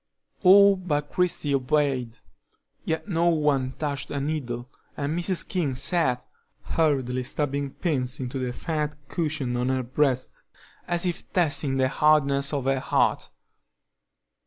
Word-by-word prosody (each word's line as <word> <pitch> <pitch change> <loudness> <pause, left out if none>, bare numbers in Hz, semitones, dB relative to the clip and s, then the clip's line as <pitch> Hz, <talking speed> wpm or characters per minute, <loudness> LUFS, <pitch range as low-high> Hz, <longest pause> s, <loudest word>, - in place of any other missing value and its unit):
All 200 +1 +7
but 150 -5 -2
Christie 175 -5 0
obeyed, 130 -3 0 0.7
yet 160 +5 -2
no 170 -3 +1
one 145 -5 +1
touched 145 -2 -3
a 140 - -3
needle, 130 -5 -3 0.3
and 145 +2 -2
Mrs. 175 +1 0
King 160 -9 -1
sat, 130 -4 +1 0.4
hurriedly 135 -6 0
stabbing 140 +2 -2
pins 135 -5 -2
into 130 +1 -4
the 125 -1 -2
fat 150 +2 -3
cushion 150 -7 -2
on 125 +1 0
her 130 -1 0
breast, 130 0 -1 0.5
as 175 +1 0
if 175 -2 -4
testing 145 -6 +1
the 130 -1 +3
hardness 140 -1 +2
of 140 -3 -1
her 135 0 +1
heart. - - +1
145 Hz, 135 wpm, -25 LUFS, 130-160 Hz, 0.7 s, All